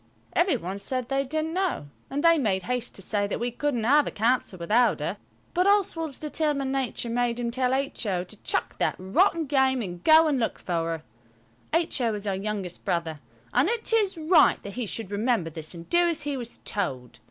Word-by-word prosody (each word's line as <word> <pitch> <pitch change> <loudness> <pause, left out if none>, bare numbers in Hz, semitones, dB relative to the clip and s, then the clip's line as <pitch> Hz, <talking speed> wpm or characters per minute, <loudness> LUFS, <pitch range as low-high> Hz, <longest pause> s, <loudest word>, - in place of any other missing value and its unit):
Every 345 -6 +3
one 190 0 -5
said 250 +4 -3
they 275 0 +1
didn't 310 +3 -2
know, 365 - -1 0.2
and 280 +2 -2
they 335 -1 +6
made 195 -7 0
haste 250 +3 -3
to 195 - -5
say 205 +1 0
that - - -3
we 240 +1 -1
couldn't 245 -2 -1
have 285 +5 +4
a - - -2
council 230 -3 0
without 220 +8 +2
her. - - -3 0.4
But 360 +2 +2
Oswald's 340 -7 +1
determined 295 -3 -1
nature 265 -3 -2
made 240 0 0
him 235 -1 -1
tell 255 +1 +1
H.O. 240 -9 -1
to 195 +3 -9
chuck - - -2
that - - +1
rotten 325 - +2
game 265 -3 +2
and 175 -3 -7
go 320 +1 +7
and 290 -4 +1
look 225 - -1
for 180 - -5 0.2
her. 165 -1 -4 0.7
H.O. 270 -9 +1
is 205 0 -6
our 200 - 0
youngest 195 -2 -4
brother, 165 -3 -2 0.3
and 255 +9 +3
it 460 0 0
is 410 -5 +2
right 320 +2 +4
that 200 - -7
he 245 -3 -3
should 205 -1 -4
remember 210 -5 0
this 155 +2 -6
and 170 0 -10
do 345 0 +3
as 330 -3 -1
he 290 -1 -2
was 240 -3 -6
told. 125 - -3
245 Hz, 205 wpm, -26 LUFS, 200-300 Hz, 0.7 s, go